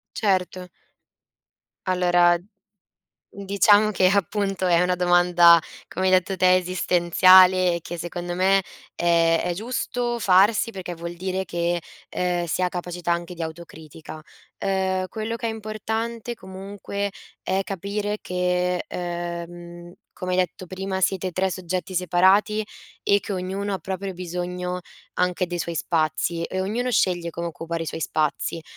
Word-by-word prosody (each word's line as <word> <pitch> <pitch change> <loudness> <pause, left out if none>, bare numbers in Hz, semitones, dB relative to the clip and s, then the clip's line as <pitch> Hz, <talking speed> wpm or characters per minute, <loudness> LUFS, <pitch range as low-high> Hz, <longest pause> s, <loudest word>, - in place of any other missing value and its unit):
Certo. 185 -3 -1 1.2
Allora 175 -1 +4
mhmm, 180 +4 -22 1.0
diciamo 205 +2 +4
che 185 -2 +3
appunto 195 0 0
è 170 -1 +4
una 180 0 +2
domanda, 175 -1 +6 0.3
come 185 - -3
hai - - +3
detto 185 +1 +2
te, 185 0 +5
esistenziale 185 0 +5
e 170 - -3
che 175 - -7
secondo 175 +1 -5
me 195 +1 +3 0.3
è 165 -1 +3
è 175 0 -1
giusto 240 +2 -2
farsi 205 +4 +4
perché 180 -3 -6
vuol 170 +1 -7
dire 185 +1 -3
che, 170 0 -1 0.3
ehm, 175 -1 -1
si 170 - -2
ha 180 - +2
capacità 175 -1 -4
anche 170 +1 -2
di 170 - -7
autocritica. 160 -1 -9 0.4
Ehm, 190 -1 0
quello 225 +2 -4
che 230 0 -3
è - - -1
importante, 220 +2 -4
comunque, 200 +1 -5 0.3
è 190 +1 0
capire 205 +2 -3
che, 180 0 0
ehm, 175 0 -6 0.2
come 185 0 -5
hai - - +1
detto 185 0 -1
prima, 190 +1 -4
siete 185 -1 0
3 190 +2 0
soggetti 185 +1 -4
separati 190 +4 +3 0.4
e 200 0 +3
che 200 - -5
ognuno 195 +2 -3
ha 190 - -3
proprio 190 0 -5
bisogno 180 0 -4 0.3
anche 180 0 0
dei 175 0 -4
suoi 170 0 -3
spazi 165 +1 -1
e 185 +2 -3
ognuno 240 +6 -1
sceglie 175 -5 +1
come 170 +1 -4
occupare 165 +1 -5
i - - -7
suoi 160 - -5
spazi. 155 +1 -1
180 Hz, 145 wpm, -24 LUFS, 175-195 Hz, 1.2 s, domanda